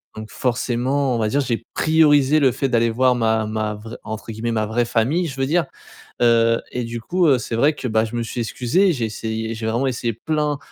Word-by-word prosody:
Donc 110 0 -8
forcément 125 +2 0
on - - -1
va 110 - +1
dire 145 +6 +1
j'ai 115 -4 -2
priorisé 155 -2 +4
le 135 -3 +4
fait 135 - -1
d'aller 115 -1 +2
voir 125 +2 +2
ma 110 -2 +1
ma 110 0 -2
vraie 110 +2 -9
entre 110 +1 -6
guillemets 115 +2 -3
«ma 110 -1 0
vraie 115 +3 0
famille» 130 +10 0
je 135 - -7
veux 135 - +1
dire, 165 +2 +2 0.6
heu 115 -1 +4
et 125 - -2
du 115 0 -5
coup, 175 +9 +1
heu, 135 -3 +4
c'est 120 - -5
vrai 145 +6 +3
que, 135 - -5
bah, 110 -1 +2
je 115 +1 -5
me 120 - -1
suis 120 - -5
excusé, 135 - +1
j'ai 125 -7 -2
essayé, 110 +1 -4
j'ai 110 0 -5
vraiment 120 +4 0
essayé 120 -2 -2
plein 150 +4 -1
120 Hz, 230 wpm, -21 LUFS, 110-140 Hz, 0.6 s, priorisé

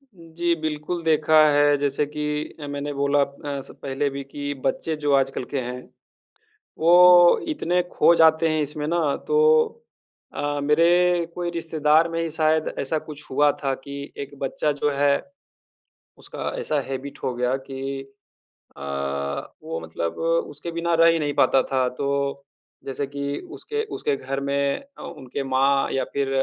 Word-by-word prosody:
जी, 170 0 -2
बिल्कुल 155 +2 -3
देखा 155 -1 +4
है 145 0 +4
जैसे 145 +1 0
कि 150 +1 -5 0.4
अ, 145 - -6
मैंने 145 0 -4
बोला 140 +1 +2 0.4
ऐसा 135 - -9
पहले 140 +1 -1
भी 140 0 -6
कि 145 +1 -5
बच्चे 155 +4 -1
जो 150 -1 -1
आजकल 135 -1 +1
के 140 - +1
हैं, 125 +1 -5 1.0
वो 175 +1 +7
इतने 180 - 0
खो - - +5
जाते 160 0 +5
हैं 155 -1 +1
इसमें 150 +1 -4
ना 160 -4 +1
तो 450 0 +2 1.0
अ, 145 0 -2
मेरे 170 +3 +3
कोई 175 -1 -2
रिश्तेदार 160 -1 +2
में 165 0 -3
ही 165 - -2
शायद 155 0 +1
ऐसा 140 +4 -1
कुछ 150 -1 -12
हुआ 145 +2 +4
था 135 -1 +1
कि 140 0 -7
एक 140 0 -7
बच्चा 140 +2 -1
जो 145 0 0
है, 140 0 +2 1.1
उसका - - -6
ऐसा 150 -2 -1
हैबिट 135 +1 -6
हो 130 - -1
गया 125 +2 0
कि 135 0 -4 0.8
अ, - - -11 0.8
वो 80 - -4
मतलब 80 +1 -4 0.3
उसके 150 +4 -7
बिना 170 +1 -1
रह 165 0 +6
ही 165 - 0
नहीं 145 -2 -1
पाता 135 -2 +4
था। 130 -1 +2
तो 140 0 -1 0.4
जैसे 135 +1 -3
कि 140 0 -4
उसके 440 0 -4
उसके 145 - 0
घर 135 +1 -4
में 140 0 0 0.2
अ, - - -11
उनके 140 -3 -6
माँ 135 +1 +3
या 135 - 0
फ़िर 140 -1 0
145 Hz, 160 wpm, -23 LUFS, 140-160 Hz, 1.1 s, वो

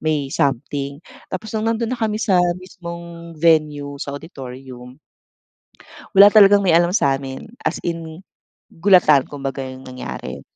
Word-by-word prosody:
may 150 -3 -1
something. 140 +1 -2 0.3
Tapos 215 +4 -6
nung 220 +1 0
nandun 230 +1 -1
na 250 - -3
kami 215 -1 0
sa 185 -5 +3 0.2
mismong 170 -2 -10
venue 150 -3 +1
sa 140 - -5
auditorium 130 -4 -10 1.2
wala 200 +1 +9
talagang 205 -1 +6
may 170 -3 +4
alam 175 +1 +3
sa'min, 135 0 -1 0.2
as - - -1
in, 165 0 -5 0.5
gulatan 165 -6 +4
kumbaga 135 -1 -5
yung 130 0 -9
nangyari. 130 0 -7
160 Hz, 130 wpm, -20 LUFS, 135-185 Hz, 1.2 s, wala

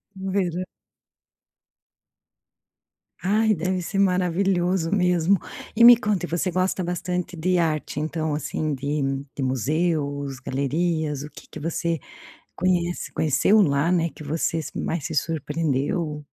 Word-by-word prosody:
No 190 0 -4
verão. 185 -2 0 2.6
Ai, 215 +3 +3
deve 180 +1 -1
ser 195 +3 -3
maravilhoso 180 -1 +1
mesmo. 180 0 +3 0.4
E 235 - +5
me 240 0 +11
conta, 210 -6 -1
e - - -10
você 170 +3 0
gosta 185 +1 0
bastante 180 0 -3
de 180 +2 +1
arte 155 -3 -1
então, 155 0 -2
assim, 150 +1 -2
de 145 +2 -2 0.3
de 135 - -3
museus, 140 +1 -1
galerias, 150 +2 -1
o 150 - -8
que - - -13
que - - -8
você 165 +1 -1 0.6
conhece 175 -1 0
conheceu 180 +7 +3
lá 145 +1 +2
né, 170 -2 +2
que - - -10
você 160 +2 -1
se 155 - -7
mais 165 -3 -2
se 160 - -5
surpreendeu? 150 0 -1
165 Hz, 130 wpm, -24 LUFS, 150-185 Hz, 2.6 s, me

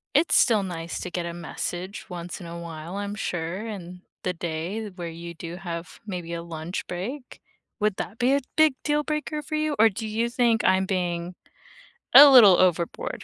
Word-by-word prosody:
It's 310 +4 +4
still 225 -4 +5
nice 170 -3 -5
to - - -5
get 175 -1 -3
a 170 - -4
message 175 +2 -5
once 175 0 -7
in 175 - -9
a 170 0 -7
while, 170 +2 -7
I'm 205 0 -4
sure, 175 0 -3
and 180 -4 -8 0.2
the 180 - -1
day 175 +6 -4
where 170 -2 -5
you 170 +1 -8
do 170 +1 -7
have 170 -2 -7
maybe 175 -4 -5
a 170 - -5
lunch 165 +1 -5
break. 240 +10 -6 0.4
Would 210 -2 +1
that 225 - -6
be 250 +2 +3
a 280 - +2
big 310 -3 +5
deal 295 0 +1
breaker 300 0 -3
for 310 +2 -5
you, 305 -1 0
or 225 - +7
do 220 +2 -5
you 230 +2 -1
think 235 -2 +2
I'm 190 0 +3
being 175 -2 -2 0.8
a 285 +1 +11
little 215 -9 +9
overboard 175 -2 0
185 Hz, 190 wpm, -25 LUFS, 170-225 Hz, 0.8 s, a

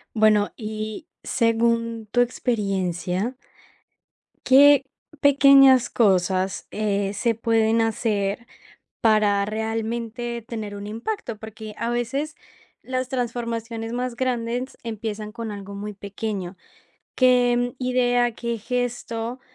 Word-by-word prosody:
Bueno, 215 -1 +4
y, 215 +4 -6 0.2
según 230 -1 +1
tu 245 - +3
experiencia 195 -3 -1 1.1
¿qué 280 +1 +7 0.4
pequeñas 275 -3 +6
cosas, 190 -3 +1
eh, 205 -2 -1
se 230 +3 0
pueden 225 0 +2
hacer, 220 -1 -1 0.5
para 210 -3 +3
realmente, 225 +2 -3
tener 215 -4 -5
un 200 0 -7
impacto? 230 - -4
Porque 220 0 -9
a 235 - -1
veces, 255 +6 -2 0.5
las 255 0 -3
transformaciones 230 -2 -3
más 250 0 -2
grandes, 245 0 -2
empiezan 215 -1 -5
con 230 -1 -5
algo 200 -1 -8
muy 205 +1 -6
pequeño. 200 -2 -5 0.6
¿Qué 245 -1 +3
idea, 245 -1 +2
qué 235 -1 -3
gesto 240 0 -3
230 Hz, 100 wpm, -23 LUFS, 210-245 Hz, 1.1 s, qué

